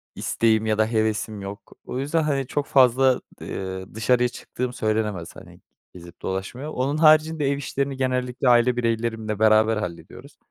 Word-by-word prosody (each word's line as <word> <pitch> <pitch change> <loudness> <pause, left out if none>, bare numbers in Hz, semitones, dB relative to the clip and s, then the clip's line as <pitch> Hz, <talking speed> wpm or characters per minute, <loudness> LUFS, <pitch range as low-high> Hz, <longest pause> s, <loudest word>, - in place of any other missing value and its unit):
isteğim 110 -1 +1
ya 110 -1 +1
da 110 0 +3
hevesim 110 -1 -1
yok. 100 +2 -9
O 125 - -4
yüzden, 150 +4 0
hani, 135 -4 -1
çok 145 0 -2
fazla, 130 -1 +4 0.2
eee, 95 0 -5
dışarıya 125 +2 +2
çıktığım 125 0 -5
söylenemez. 105 -6 -2
Hani, - - -14 0.3
gezip 85 -1 -13
dolaşmaya. 95 +10 -4
Onun 140 +3 -1
haricinde, 155 -1 +4
ev 140 - -1
işlerini 140 0 -3
genellikle 125 0 0
aile 120 +1 +4
bireylerimle 115 -2 -2
beraber 110 0 +4
hallediyoruz. 90 -5 -8
120 Hz, 150 wpm, -23 LUFS, 110-135 Hz, 0.3 s, fazla